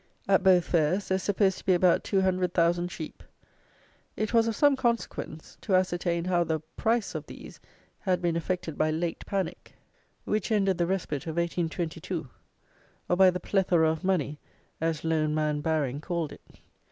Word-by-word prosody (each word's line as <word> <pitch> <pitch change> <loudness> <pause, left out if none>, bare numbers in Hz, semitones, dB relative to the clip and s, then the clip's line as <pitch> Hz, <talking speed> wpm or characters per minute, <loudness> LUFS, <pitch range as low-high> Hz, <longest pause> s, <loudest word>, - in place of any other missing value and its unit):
At 195 0 +4
both 180 -3 +5
fairs 170 +4 +1
there 190 - +2
is - - -5
supposed 195 -1 +1
to - - -14
be 185 - +5
about 175 -1 +3
two 195 -2 +1
hundred 185 -1 0
thousand 175 +1 +2
sheep. 160 -2 -7 1.0
It 215 +2 -2
was 230 -1 +4
of 225 - -1
some 290 +2 +4
consequence 235 -10 -3
to 195 - +1
ascertain 175 -2 0
how 175 -1 +2
the 160 -1 -1 0.2
price 230 -1 0
of - - -5
these - - -11 0.4
had 185 -3 0
been 175 -2 0
affected 170 -2 -3
by 155 - +3
"late 165 +2 -2
panic," 195 -2 -4 0.5
which 215 +2 -1
ended 195 -4 +2
the 170 - +2
"respite" 170 -6 -2
of 160 0 -4
1822; 170 -1 -2 0.8
or 180 - +3
by 190 0 +7
the 180 0 -2
"plethora 175 -5 +2
of 160 +2 -5
money" 155 -6 0 0.4
as 160 -1 -1
loan 155 -2 +1
man 150 -1 0
Baring 145 -3 -1
called 170 -3 -2
it. - - -12
175 Hz, 175 wpm, -28 LUFS, 160-190 Hz, 1.0 s, by